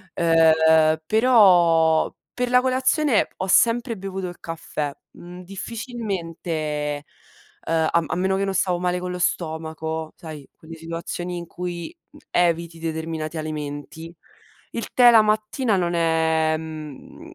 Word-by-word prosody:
Ehm, 160 Hz, -1 st, +4 dB
però 175 Hz, -8 st, +4 dB, 0.2 s
per 250 Hz, 0 st, -2 dB
la 250 Hz, 0 st, +5 dB
colazione 260 Hz, 0 st, +2 dB
ho 190 Hz, -, -3 dB
sempre 230 Hz, +3 st, +3 dB
bevuto 190 Hz, -1 st, -5 dB
il 175 Hz, 0 st, -9 dB
caffè, 155 Hz, -3 st, -4 dB, 0.2 s
mhmm, 180 Hz, +1 st, -11 dB
difficilmente, 195 Hz, -3 st, -6 dB
ehm, 150 Hz, -2 st, -2 dB, 0.9 s
a 170 Hz, -, +4 dB
m -, -, -6 dB
a -, -, -1 dB
meno 190 Hz, +2 st, 0 dB
che 195 Hz, -, 0 dB
non 195 Hz, -, -2 dB
stavo 180 Hz, -2 st, 0 dB
male 180 Hz, 0 st, -1 dB
con 180 Hz, 0 st, -5 dB
lo 180 Hz, -, -5 dB
stomaco, 160 Hz, -2 st, -3 dB
sai, 155 Hz, -4 st, -10 dB
quelle 165 Hz, +1 st, -12 dB
situazioni 170 Hz, +2 st, -5 dB
in 170 Hz, -, -6 dB
cui, 175 Hz, -, -6 dB, 0.2 s
mhmm, 295 Hz, -, -16 dB
eviti 170 Hz, -1 st, 0 dB
determinati 160 Hz, -1 st, -4 dB
alimenti, 155 Hz, +2 st, -6 dB, 0.6 s
il 230 Hz, -, -6 dB
tè 245 Hz, -1 st, +7 dB
la 225 Hz, -2 st, +7 dB
mattina 215 Hz, +2 st, 0 dB
non 175 Hz, -2 st, 0 dB
è, 160 Hz, -1 st, +2 dB
mhmm, 155 Hz, -3 st, -10 dB
170 Hz, 140 wpm, -23 LUFS, 160-195 Hz, 0.9 s, tè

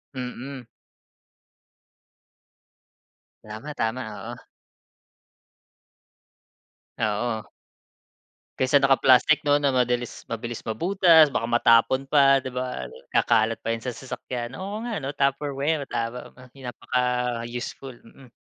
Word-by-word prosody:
Mm. 130 Hz, +1 st, -6 dB, 2.8 s
Tama-tama, 115 Hz, +2 st, -4 dB, 0.3 s
oo. 120 Hz, -, -9 dB, 2.6 s
Oo. 110 Hz, 0 st, -2 dB, 1.1 s
Kaysa 130 Hz, +2 st, +2 dB
naka-plastic, 135 Hz, +2 st, +5 dB
'no, 145 Hz, -, +5 dB
na 145 Hz, -2 st, +2 dB
madilis 125 Hz, -1 st, -1 dB
mabilis 115 Hz, 0 st, -5 dB
mabutas. 165 Hz, -, +5 dB
Baka 115 Hz, -, -1 dB
matapon 120 Hz, +2 st, +4 dB
pa, 135 Hz, -2 st, +5 dB
'di 130 Hz, -, -5 dB
ba? 125 Hz, -, -4 dB, 0.2 s
Kakalat 115 Hz, -1 st, +2 dB
pa 115 Hz, -, -1 dB
yun 115 Hz, -, -2 dB
sa 125 Hz, 0 st, -5 dB
sasakyan. 125 Hz, -2 st, -6 dB
Oo 205 Hz, +4 st, -5 dB
nga 230 Hz, -6 st, -3 dB
ano, 140 Hz, +1 st, -5 dB
tupperware, 140 Hz, +1 st, 0 dB
tama, 120 Hz, +1 st, -4 dB, 0.2 s
napaka-useful, 125 Hz, -1 st, -3 dB
mm. 130 Hz, +2 st, -17 dB
125 Hz, 90 wpm, -25 LUFS, 120-140 Hz, 2.8 s, naka-plastic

